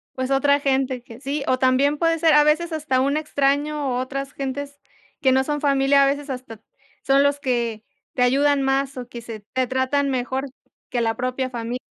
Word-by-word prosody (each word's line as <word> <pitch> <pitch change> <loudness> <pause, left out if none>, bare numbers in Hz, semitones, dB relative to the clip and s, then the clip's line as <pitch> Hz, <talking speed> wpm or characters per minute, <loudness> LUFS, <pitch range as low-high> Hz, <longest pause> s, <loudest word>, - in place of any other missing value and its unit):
Pues, 260 +1 -3
otra 280 +1 +3
gente 265 -3 0
que 230 -1 -13
sí, 280 +2 -3
o 255 - +1
también 265 +3 +3
puede 330 +1 +2
ser, 320 -1 +4
a 295 0 +7
veces 315 +3 +1
hasta 300 -5 0
un 280 +3 +1
extraño 285 -2 0
o - - 0
otras 275 +1 -4
gentes 280 +1 -5 0.4
que 265 -3 +4
no 265 +1 +3
son 295 +1 -3
familia, 275 -1 +4
a - - +5
veces 285 +1 -2
hasta 250 -4 -7 0.4
son 270 +1 +4
los 285 0 +1
que 235 -5 -2 0.3
te 250 - +1
ayudan 280 +2 +3
más 270 0 0
o 250 -1 -6
que 240 -1 -9
se 225 -2 -8
te 255 -1 +1
tratan 260 +3 0
mejor 260 +1 -2 0.4
que 240 - -1
la 225 -1 0
propia 255 +1 -2
fami 235 0 -4
270 Hz, 200 wpm, -22 LUFS, 255-285 Hz, 0.4 s, a